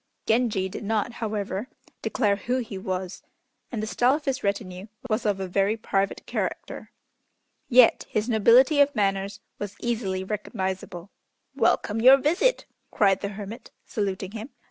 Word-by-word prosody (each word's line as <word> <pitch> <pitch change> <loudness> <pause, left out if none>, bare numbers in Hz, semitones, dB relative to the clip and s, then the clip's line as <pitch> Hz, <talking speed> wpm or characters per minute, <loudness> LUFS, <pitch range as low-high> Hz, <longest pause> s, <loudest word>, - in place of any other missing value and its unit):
Genji 220 -5 +1
did 190 - -7
not, 220 +2 0
however, 210 0 -3 0.3
declare 210 -6 +1
who 245 +6 -2
he 230 -5 -5
was, 185 -1 -4 0.5
and 220 -4 -3
the - - 0
style 245 +4 +2
of 300 - -6
his 270 -2 -1
retinue 200 -1 -3 0.2
was 215 +1 0
of 200 -2 0
a 190 - -3
very 200 +4 +1
private 195 -2 -1
character. - - -4 0.8
Yet 250 -2 +5
his 215 +1 -1
nobility 245 +6 +5
of 285 0 +3
manners 200 0 -1 0.2
was 205 -1 -5
easily 210 -6 -2
recognizable. 190 -3 -4 0.4
"Welcome 225 +1 +1
your 260 +3 +9
visit!" 350 - +1 0.2
cried 195 -2 +2
the 200 - -2
hermit, 215 +4 -8 0.2
saluting 195 -2 -3
him. 225 +3 -7
210 Hz, 145 wpm, -25 LUFS, 195-240 Hz, 0.8 s, your